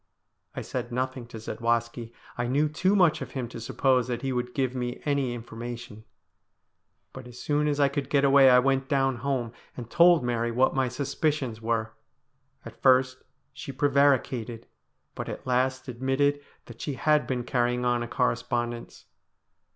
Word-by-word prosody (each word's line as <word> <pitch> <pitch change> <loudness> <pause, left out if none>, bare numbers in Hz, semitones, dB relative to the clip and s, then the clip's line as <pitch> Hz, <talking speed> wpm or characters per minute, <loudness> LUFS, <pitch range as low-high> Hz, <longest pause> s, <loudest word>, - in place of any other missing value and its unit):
I - - -4
said 120 - -5
nothing 130 0 -3
to 115 - -9
Zadwaski. 115 +1 -2 0.2
I 120 0 -2
knew 145 +5 +2
too 185 +6 +1
much 175 -6 +3
of - - -7
him 130 -3 -3
to 115 - -8
suppose 130 +2 +1
that 120 0 -4
he 135 -1 -1
would 125 0 -3
give 130 -2 0
me 125 -1 -4
any 140 -4 0
in 115 - -7
formation. 115 -2 -8 1.1
But 130 -1 -9
as 120 0 -12
soon 150 0 0
as 145 -1 0
I 140 - +5
could 140 0 -3
get 140 -1 +2
away 135 -1 +7
I 125 - +7
went 135 +1 +1
down 135 -3 +1
home, 125 -2 -2 0.2
and 120 -2 -8
told 170 -4 +5
Mary 120 -1 -1
what 125 +3 +2
my 130 -1 +1
suspicions 140 -2 -2
were. 115 -1 -1 0.7
At - - -12
first 130 0 +3 0.3
she 135 +1 -7
pre 145 +2 +1
varicated, 130 -4 +1 0.5
but - - -6
at - - -7
last 130 +1 0
admitted 135 +3 0 0.2
that 115 -1 -12
she 145 - -3
had 150 +2 +2
been 125 -2 -2
carrying 125 -1 0
on 120 -1 +1
a 120 - -3
correspondence. 120 0 -2
130 Hz, 175 wpm, -27 LUFS, 120-140 Hz, 1.1 s, away